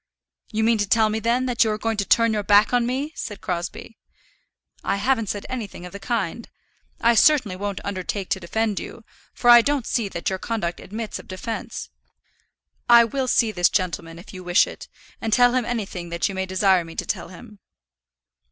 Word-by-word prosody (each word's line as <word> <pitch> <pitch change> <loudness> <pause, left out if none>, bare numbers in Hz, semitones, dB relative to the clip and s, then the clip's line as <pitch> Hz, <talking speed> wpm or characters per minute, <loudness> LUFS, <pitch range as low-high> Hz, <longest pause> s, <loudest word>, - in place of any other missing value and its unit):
"You 220 0 0
mean 225 0 +3
to 205 -1 -1
tell 220 -2 +4
me, 220 - -1
then, 235 +3 +1
that 245 -2 +2
you 220 - 0
are 215 - -1
going 225 0 -2
to 200 - 0
turn 230 +1 +3
your 210 - 0
back 205 +3 +4
on 240 -1 +2
me?" 275 +5 -2
said 210 -3 -6
Crosbie. 175 +5 -5 0.8
"I - - 0
haven't 225 0 0
said 205 - -4
anything 215 -8 -6
of 180 - -10
the 200 - -7
kind. 225 0 -3 0.5
I 235 - +4
certainly 235 -5 +4
won't 200 0 -4
undertake 195 0 -4
to 190 - 0
defend 210 +3 -1
you, 230 - -9 0.3
for - - -3
I 240 0 +10
don't 285 -1 0
see 225 -5 -1
that 170 - -5
your 190 -1 -1
conduct 185 -7 -3
admits 220 +2 -6
of - - -13
defence. 205 +5 -6 1.0
I 235 0 +9
will 260 +3 -2
see 230 -2 +2
this 175 -4 +3
gentleman 170 -3 -2
if 175 - -13
you 185 -1 -8
wish 175 +2 +4
it, - - -10 0.3
and 225 - -2
tell 245 +1 +5
him 255 -2 +1
anything 195 -7 -4
that 170 0 -1
you 195 - -5
may 190 0 -3
desire 185 -1 +3
me 165 0 -11
to - - -3
tell - - -3
him." 205 +3 -13
215 Hz, 205 wpm, -23 LUFS, 190-235 Hz, 1.0 s, I